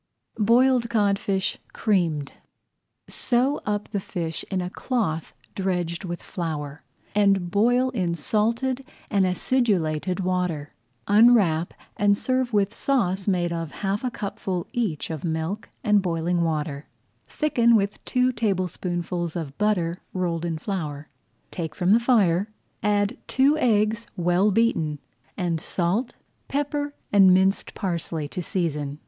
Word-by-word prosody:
BOILED 240 +2 +4
CODFISH 200 -3 0
CREAMED 165 -9 0 0.8
Sew 260 +4 0
up 210 0 -1
the 205 - -1
fish 170 -4 -4
in 190 - -1
a 180 0 -3
cloth 195 - -2 0.2
dredged 180 -3 -2
with 175 -1 -5
flour, 155 -5 -4 0.3
and 195 -3 +2
boil 245 +6 +3
in 180 -8 -1
salted 230 - 0 0.3
and 195 -3 +3
acidulated 180 -5 0
water. 180 -5 -1 0.3
Unwrap, 205 -7 +4 0.2
and 205 0 +3
serve 255 0 0
with 205 -1 +1
sauce 195 -9 0
made 175 -3 +1
of 165 -2 -3 0.2
half 195 +4 0
a 255 - 0
cupful 195 -5 -4
each 200 -11 -2
of 160 - -5
milk 165 +5 -3
and 210 -2 +4
boiling 170 -1 0
water, 150 -3 -2 0.4
thickened 235 -7 +3
with 200 0 -2
two 255 0 +2
tablespoonfuls 180 -5 -2
of 150 -5 -4
butter 195 -6 +1 0.2
rolled 175 -2 -1
in 165 -2 -2
flour. 155 -5 -4 0.4
Take 160 -4 -5
from 180 +1 +1
the 225 - +6
fire, 205 -6 +3 0.3
add 205 +2 +1
two 275 +3 +3
eggs 220 -2 +2
well 180 +3 +3
beaten, 195 -9 +1 0.4
and 170 -3 -1
salt, 195 +8 -1 0.3
pepper, 290 +1 -2 0.2
and 195 -2 +7
minced 190 +1 +1
parsley 170 -5 -3
to 180 - -4
season. 150 -5 -2
190 Hz, 130 wpm, -25 LUFS, 170-220 Hz, 0.8 s, and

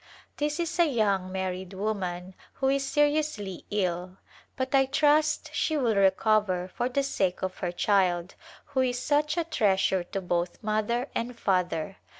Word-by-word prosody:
This 295 +2 -1
is 335 0 -2
a 340 - +6
young 200 -7 +1
married 190 0 -4
woman 190 -3 -3 0.2
who 265 - 0
is 275 0 +1
seri 295 +2 +3
ously 205 - -5
ill, 185 -2 -2 0.4
but 260 0 -3
I 270 -1 +4
trust 300 +2 +2
she 315 - 0
will 240 -6 +2
recover 190 -1 +2
for 245 +1 -1
the 275 +2 0
sake 190 -10 -1
of 185 -1 -3
her 175 -2 -2
child 180 -2 +1 0.3
who 280 -2 -3
is 250 -1 0
such 300 +4 +1
a 340 - +2
treasure 190 - +1
to 195 - -4
both 175 -1 -1
mother 215 +4 0
and 235 +1 -3
father. 180 -2 0
210 Hz, 160 wpm, -27 LUFS, 185-275 Hz, 0.4 s, a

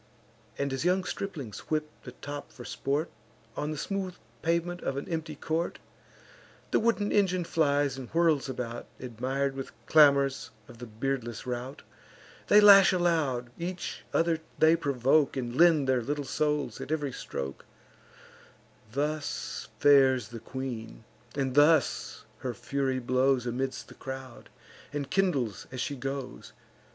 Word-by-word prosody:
And, 140 -1 -1
as 135 - -2
young 180 +2 +2
striplings 150 - -5
whip 155 -1 0 0.2
the 125 - -8
top 145 +2 -7
for 120 - -11
sport, 145 +4 -2 0.4
On 150 - -2
the 155 - -4
smooth 190 +2 -3 0.3
pavement 170 +2 0
of 135 - -2
an 140 - -4
empty 160 -2 -3
court; 160 +4 -2 0.9
The - - +4
wooden 220 -2 +1
engine 185 -3 +2
flies 145 -5 +1
and 125 - -8
whirls 160 -5 +2
about, 120 -2 -5
Admir'd, 130 +3 -2
with 135 -1 -6
clamours, 140 -3 +4 0.2
of 115 - -14
the 120 - -7
beardless 120 +1 -3
rout; 125 +2 -5 0.6
They 210 - +7
lash 200 -2 +9
aloud; 160 -9 +1
each 175 +1 -5
other 165 -1 +2 0.2
they 160 +1 +6
provoke, 140 0 +2
And 120 -2 -3
lend 160 -3 +5
their 130 -1 +2
little 145 +4 -3
souls 150 +1 -1
at - - -6
ev'ry 145 -3 -1
stroke: 70 - -5 1.3
Thus 150 +2 -3
fares 135 -5 +5
the 115 -1 -7
queen; 115 - -6 0.3
and 135 -2 -1
thus 145 0 +3
her 125 -2 -4
fury 135 +2 -1
blows 130 +1 +2
Amidst 130 +2 -3
the - - -12
crowd, 130 -2 -8 0.4
and 145 -2 -4
kindles 145 - 0
as 130 - -6
she 140 - -2
goes. 135 - -6
140 Hz, 140 wpm, -29 LUFS, 130-160 Hz, 1.3 s, lash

